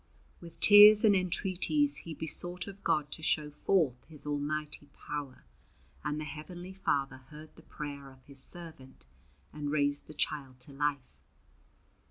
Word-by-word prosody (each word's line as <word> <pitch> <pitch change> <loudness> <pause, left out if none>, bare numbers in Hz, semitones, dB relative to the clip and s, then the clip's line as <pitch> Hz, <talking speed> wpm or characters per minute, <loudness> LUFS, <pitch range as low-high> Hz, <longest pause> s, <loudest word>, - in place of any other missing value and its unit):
With 170 -1 -13
tears 210 +1 +9
and 205 -2 +5
entreaties 190 - 0
he 165 -2 -8
besought 175 +3 0
of 200 0 -11
God 150 -1 0
to - - -7
show 150 -1 -1
forth 150 -4 0
His 150 -3 -6
almighty 150 0 -4 0.2
power, 145 -3 -6 0.6
and 150 - -2
the - - -4
Heavenly 175 +5 -9
Father 140 -8 -1
heard 155 +1 -13
the - - -16
prayer 140 -2 -8
of 130 -1 -19
His 140 -2 -6
servant 155 - -5 0.5
and 150 -1 -4
raised 145 -1 0
the 155 - -12
child 135 -4 -4
to 135 - -5
life. 135 - -3
150 Hz, 150 wpm, -31 LUFS, 145-175 Hz, 0.6 s, tears